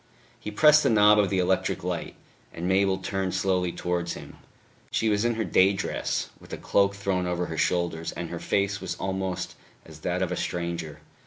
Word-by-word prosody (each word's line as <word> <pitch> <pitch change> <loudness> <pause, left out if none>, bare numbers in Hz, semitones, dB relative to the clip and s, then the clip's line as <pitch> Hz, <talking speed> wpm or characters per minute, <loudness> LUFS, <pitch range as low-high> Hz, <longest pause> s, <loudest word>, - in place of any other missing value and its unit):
He - - -6
pressed 150 +8 +6
the - - +2
knob 105 -1 +6
of 100 -2 +3
the 95 - 0
electric 90 +1 0
light; - - -3 0.4
and 85 +2 -4
Mabel 95 0 +3
turned 95 -1 -2
slowly 90 -2 +1
towards 85 -1 -2
him. - - -10 0.5
She 110 - +1
was 105 0 +1
in 120 -1 +1
her 110 - -1
day 95 -1 +4
dress, 100 - -2
with - - -16
a - - -4
cloak 100 0 +2
thrown 95 -3 -1
over 90 0 -1
her 80 - -5
shoulders, 85 -2 0
and 85 -1 -5
her 85 - -4
face 100 +1 0
was 90 -2 -4
almost 95 -1 -3 0.3
as 80 -1 -13
that 90 +3 -1
of 90 - -2
a - - 0
stranger. 85 -4 -4
95 Hz, 195 wpm, -26 LUFS, 90-100 Hz, 0.5 s, pressed